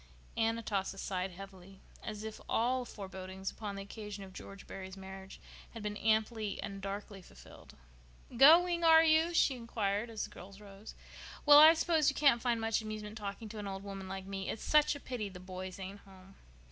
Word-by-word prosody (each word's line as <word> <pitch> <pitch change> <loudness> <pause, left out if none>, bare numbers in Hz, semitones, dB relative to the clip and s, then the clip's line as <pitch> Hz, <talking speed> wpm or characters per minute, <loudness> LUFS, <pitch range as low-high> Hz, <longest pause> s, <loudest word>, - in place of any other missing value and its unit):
Aunt 225 0 +1
Atossa 200 -4 -3
sighed 190 -1 -3
heavily, 190 0 -12 0.2
as 215 0 -6
if 220 0 -7
all 250 +2 +1
forebodings 190 -3 -7
upon 205 -2 -6
the 195 - -6
occasion 210 0 -8
of 190 -1 -12
George 195 +1 -10
Barry's 190 0 -8
marriage 190 0 -10 0.4
had 225 - -7
been 210 0 -3
amply 220 0 0
and 195 -1 -6
darkly 200 0 -6
fulfilled. - - -15 0.6
"Going, 340 +6 +6
are 325 0 +7
you?" 320 +1 +4
she 280 - +4
inquired, 225 -2 -2
as 220 -2 -4
the - - -7
girls 195 +2 -12
rose. 200 0 -12 0.5
"Well, 290 0 +10
I 315 +2 +9
suppose 320 -2 +2
you 285 - -3
can't 275 -5 +4
find 240 -2 0
much 225 0 0
amusement 215 -1 -6
talking 210 +1 -6
to 215 0 -7
an 205 - -5
old 195 0 -6
woman 195 -1 -7
like 190 0 -6
me. 195 0 -5
It's - - -5
such 300 0 +4
a - - -7
pity 240 -7 -5
the 185 -1 -11
boys 185 0 -7
ain't 195 +1 -7
home." 190 -1 -17
210 Hz, 190 wpm, -33 LUFS, 195-230 Hz, 0.6 s, Well